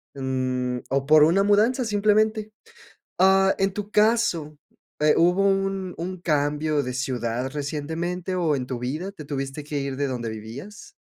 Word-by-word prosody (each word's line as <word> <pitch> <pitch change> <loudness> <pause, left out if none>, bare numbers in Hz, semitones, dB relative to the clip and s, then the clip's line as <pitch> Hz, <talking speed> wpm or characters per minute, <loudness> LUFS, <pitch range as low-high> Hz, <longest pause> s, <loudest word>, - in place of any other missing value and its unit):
mm, 130 -2 -2
o 135 +1 0
por 150 0 +6
una 175 +5 +4
mudanza, 220 +6 +3
simplemente. 215 +1 +1 0.7
Ah 190 +1 +5
en 195 0 +2
tu 205 0 -6
caso, 210 -9 +2 0.4
eh, 150 0 +4
¿hubo 180 +3 +3
un 195 -1 -1
un 180 +2 -5
cambio 150 -1 0
de 125 - -4
ciudad 125 -1 -2
recientemente 160 +5 -3
o 165 -5 +1
en 125 - -3
tu 125 -2 -4
vida 150 +10 -4
te 160 - -10
tuviste 135 0 -4
que 145 0 -3
ir 140 -1 -3
de 140 0 0
donde 120 -3 -3
vivías? 115 - -9
155 Hz, 160 wpm, -24 LUFS, 135-195 Hz, 0.7 s, por